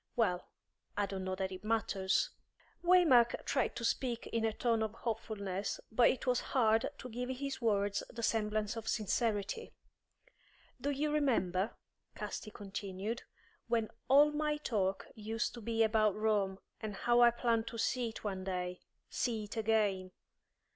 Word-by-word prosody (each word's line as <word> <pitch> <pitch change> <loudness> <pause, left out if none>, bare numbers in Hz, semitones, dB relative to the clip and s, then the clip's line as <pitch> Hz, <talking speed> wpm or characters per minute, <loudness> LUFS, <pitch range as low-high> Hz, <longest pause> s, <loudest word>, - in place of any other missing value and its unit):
Well, 180 -7 +1 0.5
I 205 - +2
don't 195 -1 -4
know 185 0 -1
that 190 0 -2
it 185 +1 -7
matters." 215 - +1 0.5
Waymark 325 -10 +5
tried 270 - 0
to 235 - -3
speak 240 0 0
in 230 -1 -1
a 225 - +2
tone 230 0 +1
of 220 0 -2
hopefulness, 210 -4 -3
but 235 +2 +5
it 260 - -1
was 250 -1 +3
hard 225 -4 +2
to - - -7
give 250 +1 -4
his 275 +1 -3
words 205 -3 +1
the 230 -1 -7
semblance 215 -1 0
of 225 -1 -6
sincerity. 215 - -1 1.1
"Do 285 - 0
you 290 +2 0
remember," 225 -9 +1 0.4
Casti 215 - -5
continued, 200 +2 -5 0.5
"when 225 -2 +1 0.2
all 290 +3 +7
my 300 0 0
talk 195 -9 -1
used 220 +2 -2
to 235 - -8
be 225 +1 +2
about 215 -2 +3
Rome, 210 -3 +1 0.2
and 215 -2 -5
how 240 +4 +3
I 240 - +9
planned 235 -1 0
to 230 - -5
see 240 +1 0
it 220 - -9
one 190 -3 -3
day 180 -1 -3 0.3
see 225 -4 -1
it 205 - -8
again. 210 -4 +1
220 Hz, 155 wpm, -34 LUFS, 200-240 Hz, 1.1 s, I